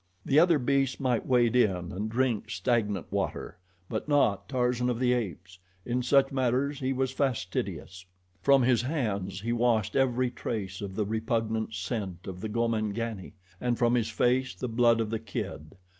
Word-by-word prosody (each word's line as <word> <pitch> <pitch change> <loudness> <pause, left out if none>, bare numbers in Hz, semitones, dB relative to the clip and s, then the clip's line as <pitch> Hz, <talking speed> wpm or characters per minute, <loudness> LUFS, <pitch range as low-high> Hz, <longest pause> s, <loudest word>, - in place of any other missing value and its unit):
The 140 - +4
other 170 -1 +5
beasts 135 0 +1
might 125 -4 0
wade 120 -2 +3
in 95 -8 +2
and 105 +4 -3
drink 120 -2 0
stagnant 105 -7 -1
water; - - -3 0.3
but - - -4
not 130 -9 +2
Tarzan 125 -1 +1
of 120 - -1
the 125 0 +2
Apes. 95 -6 -4 0.3
In 125 +1 0
such 135 +2 +3
matters 135 +2 0
he 130 -1 -1
was 130 0 0
fastidious. 95 -7 -3 0.3
From 140 -2 +5
his 120 -2 +3
hands 105 - -2
he 115 +2 -1
washed 115 -3 +1
every 130 -2 +2
trace 100 -7 -4
of 100 -2 -6
the 105 - 0
repugnant 110 0 -1
scent 95 -2 -4
of 90 -1 -7
the 110 - -3
Gomangani, 110 -2 -2 0.3
and 120 -1 0
from 120 -1 +2
his 115 -2 +1
face 125 +3 +1
the 125 - -4
blood 115 0 +3
of 110 -1 -3
the 115 - -1
kid. 75 -2 -6
120 Hz, 170 wpm, -28 LUFS, 105-125 Hz, 0.3 s, other